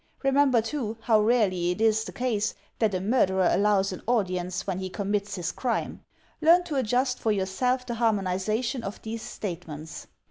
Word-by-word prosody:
Remember, 270 -4 +4
too, 230 -3 -3
how 220 -2 +3
rarely 210 -6 +2
it 180 - -2
is 220 0 +3
the - - -6
case 225 -4 -1 0.2
that 215 -4 +2
a - - 0
murderer 190 -3 +2
allows 200 -1 +2
an 185 - -7
audience 185 -6 0
when 190 -2 -2
he 190 0 -4
commits 200 0 -2
his 180 -3 -3
crime. 245 -3 -3 0.4
Learn 340 +3 +6
to 320 -4 -5
adjust 250 +1 +1
for 220 - +1
yourself 230 +6 0
the 240 - -3
harmonization 220 +2 0
of 200 -1 -6
these 225 0 -5
statements. 160 -7 -7
215 Hz, 170 wpm, -27 LUFS, 190-245 Hz, 0.4 s, Learn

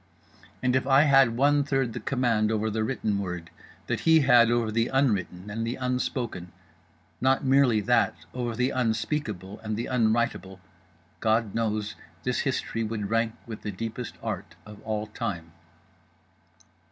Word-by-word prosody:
And 130 0 +2
if 130 0 +1
I 135 +1 +6
had 135 -5 +5
one 145 +2 +4
third 135 -4 0
the - - -4
command 115 -5 +1
over 110 0 0
the 110 +1 -1
written 110 -4 -1
word 90 -3 -5 0.3
that - - -1
he 160 -1 +5
had 120 -4 +6
over 120 -2 +1
the 115 +2 +1
unwritten 105 -9 0
and 115 +2 -3
the 115 +2 -2
unspoken—not 95 - -3
merely 130 -5 +4
that; - - +2 0.2
over 120 -2 -3
the 125 +2 +1
unspeakable 110 - -2
and 110 -1 -4
the 115 - -2
unwritable—God 95 -3 -2
knows 110 -2 -1 0.3
this - - 0
history 115 - -1
would 105 -2 -3
rank 115 0 +1
with 115 -2 -8
the 105 - -4
deepest 115 +4 -5
art - - -5
of 105 -1 -12
all 110 -1 -3
time. 85 -6 -5
115 Hz, 145 wpm, -27 LUFS, 100-125 Hz, 0.3 s, I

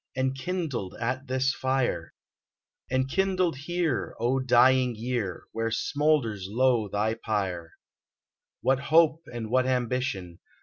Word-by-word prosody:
Enkindled 135 - -2
at 130 +4 -2
this 130 +2 +1
fire! 130 -1 -1 0.4
— - - -33
Enkindled 180 +6 +1
here, 160 0 -2
O 125 +3 +1
dying 130 0 +4
year! 115 -5 -3
Where 115 0 -1
smoulders 120 -4 0
low 120 -1 +2
thy 105 +3 0
pyre. 95 -7 -3 0.9
What 135 0 +2
hope 160 +2 +4
and 115 -2 -5
what 130 0 +3
ambition. 125 -8 -2
130 Hz, 115 wpm, -27 LUFS, 115-135 Hz, 0.9 s, dying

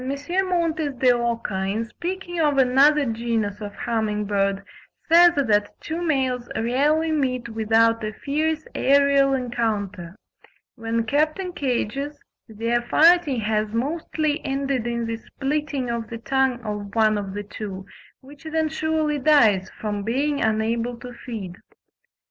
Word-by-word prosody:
Montes 320 +1 -1
de 255 0 +4
Oca, 235 -5 -1
in 215 +4 -1
speaking 350 +5 -4
or 290 -3 +2
another 275 +3 +4
genus 225 -3 -2
of 205 -1 -7
humming 215 -2 -1
bird, 200 -1 0 0.4
says 345 +1 +7
that 215 -7 +1
two 325 +2 -5
males 260 -7 0
rarely 295 +8 +1
meet 255 -5 -1
without 225 +1 +2
a 215 - -2
fierce 310 +6 -2
aerial 280 0 +3
encounter: 210 -8 -3 0.6
when 230 0 -2
kept 300 +7 +1
in 370 -2 -5
cages 275 +1 -2 0.3
"their 230 +2 -1
fighting 315 -1 +4
has 215 0 -1
mostly 310 +3 -1
ended 270 -3 -1
in 235 -1 -2
the 230 0 -3
splitting 275 0 -3
of 230 -1 -4
the 230 - -5
tongue 265 +1 0
of 210 -2 -6
one 215 -1 +4
of 200 -1 -4
the 205 - -4
two, 195 -2 -7 0.4
which 280 +3 -15
then 315 0 0
surely 315 -1 -1
dies 230 -10 +4
from 210 -1 -3
being 275 +7 -1
unable 230 +2 0
to 245 +1 -9
feed." 210 -7 -7
245 Hz, 135 wpm, -23 LUFS, 220-295 Hz, 0.6 s, says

